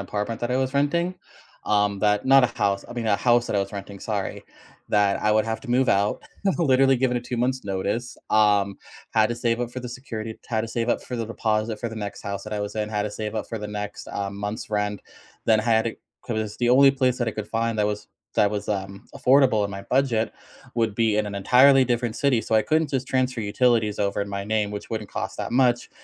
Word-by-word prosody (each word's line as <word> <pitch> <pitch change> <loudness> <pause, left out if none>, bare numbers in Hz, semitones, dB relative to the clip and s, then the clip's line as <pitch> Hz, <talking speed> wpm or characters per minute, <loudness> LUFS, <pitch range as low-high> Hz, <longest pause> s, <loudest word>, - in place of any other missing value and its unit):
apartment 105 +3 -3
that 120 - -2
I - - +2
was 130 0 0
renting, 170 +6 +1 0.5
um, 105 -1 +1
that 105 +3 +1
not 135 -1 +7
a - - +5
house, 100 -3 0
I - - -7
mean 120 -2 -3
a 100 - +3
house 120 +1 +3
that - - 0
I - - +3
was 100 +1 -4
renting, 100 0 -7
sorry, 100 -1 -4 0.4
that 100 -1 +2
I 105 - +2
would 110 0 +3
have 110 0 -3
to 125 - -7
move 130 +1 +3
out, 100 +1 +1 0.4
literally 135 -4 +4
given 125 -1 +1
a 120 - 0
2 125 - -5
months 130 +1 0
notice, 100 +5 -2
um, 105 -2 +3 0.4
had 110 -1 +4
to 120 - -1
save 120 0 0
up 120 -1 -2
for 130 - -5
the 125 - -6
security, 115 -4 -6
had 110 -2 0
to 115 - -4
save 115 +1 -2
up - - +1
for 125 - -5
the 115 -1 -3
deposit 110 -1 -1
for 115 - -2
the 115 - -8
next 105 -2 -6
house 100 -2 -5
that 105 - -7
I 105 - -2
was 105 +1 -5
in, 105 -1 -1
had 105 -1 -1
to 105 - -3
save 110 0 -5
up 110 - -3
for 115 - -4
the 105 - -5
next, 105 0 -6
uh, 100 -1 -3
month's 105 +2 -5
rent. 105 -1 -1 0.4
Then 110 -1 +4
I - - -6
had 115 -1 +3
to 115 - -2 0.3
'cause 110 -2 -3
the 120 - +1
only 135 +2 +7
place 130 -2 +1
that 120 - 0
I - - +1
could 110 -1 -6
find 115 0 -1
that 105 - +3
was 105 0 -3 0.3
that 100 - +3
was, 105 -1 -3
um, 100 -1 -4
affordable 130 -5 +4
in 100 - -2
my 100 0 -6
budget 120 -2 +1 0.4
would 115 -3 0
be 110 -1 +2
in 105 - +1
an 100 - -5
entirely 130 +6 +6
different 120 -1 -1
city, 135 -4 +2
so, 110 - -2
I 110 - +5
couldn't 155 -1 +1
just 130 -1 -1
transfer 130 -2 0
utilities 110 0 +1
over 100 0 0
in 100 - -6
my 100 0 -3
name, 105 0 0
which 105 - -6
wouldn't 110 -2 -5
cost - - -4
that - - -4
much. 125 -1 +2
110 Hz, 250 wpm, -24 LUFS, 105-125 Hz, 0.5 s, not